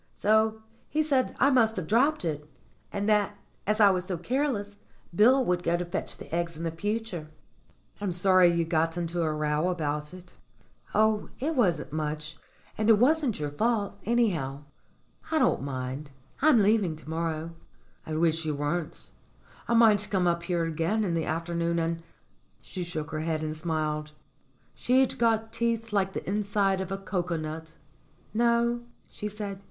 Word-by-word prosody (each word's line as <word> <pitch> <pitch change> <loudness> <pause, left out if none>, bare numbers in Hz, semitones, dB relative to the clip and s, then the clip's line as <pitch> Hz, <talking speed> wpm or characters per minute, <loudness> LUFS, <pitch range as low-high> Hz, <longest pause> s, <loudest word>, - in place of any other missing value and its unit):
So 220 +1 +2 0.3
he 310 +1 +1
said 270 -4 +1
I 280 - +5
must 225 -4 +4
have 185 - -3
dropped 250 - +2
it, 150 -2 -3 0.4
and 200 +1 -2
that, 210 -1 +2 0.3
as 215 +1 +1
I 205 -2 +7
was 185 -1 -1
so 185 -2 -3
careless, 210 - -1 0.4
Bill 250 +7 +5
would 180 -3 +1
go 170 0 +1
to 175 - -3
fetch 175 +3 -4
the - - -11
eggs 170 -1 -1
in 165 0 -2
future." 205 -2 -3 0.7
"I'm 200 -3 -1
sorry 185 0 +5
you 170 -1 +1
got 165 0 0
into 170 0 -2
a 160 -2 +1
row 150 +2 0
about 150 -4 -2
it." 180 -1 -13 0.6
"Oh, 215 0 +2
it 310 +5 -1
wasn't 175 - +1
much; 155 0 -3 0.4
and 215 +1 +2
it 220 - +7
wasn't 270 - +2
your 145 -1 -2
fault, 215 +4 0
any 235 +1 +3
how. 135 -3 -4 0.7
I 320 - +1
don't - - +3
mind 135 +1 -4 0.3
I'm 275 -7 +6
leaving 200 -5 +2
to 155 - -15
morrow." 160 0 -2 0.5
"I 155 - -5
wish 165 0 +2
you 155 -2 -1
weren't. 150 +3 -3 0.6
I 235 - +2
might 210 -3 +5
come 190 -3 +1
up 170 -1 +1
here 170 -1 -1
again 165 +7 0
in 180 -4 -1
the 165 - 0
afternoon 170 +1 -1
and 165 0 -1 0.3
" - - -39
She 185 - -6
shook 160 -3 -5
her 155 - -2
head 155 0 -1
and 155 0 -3
smiled. 155 -2 -2 0.6
She'd 260 +1 +2
got 225 -1 +1
teeth 230 -1 -1
like 195 -1 +1
the - - -5
inside 200 -1 +1
of 190 0 -5
a 195 - -1
cocoa 180 -3 -2
nut. 160 +1 -6 0.6
"No," 235 +1 +2 0.3
she 210 - -6
said. 205 -2 -5
180 Hz, 170 wpm, -28 LUFS, 160-220 Hz, 0.7 s, I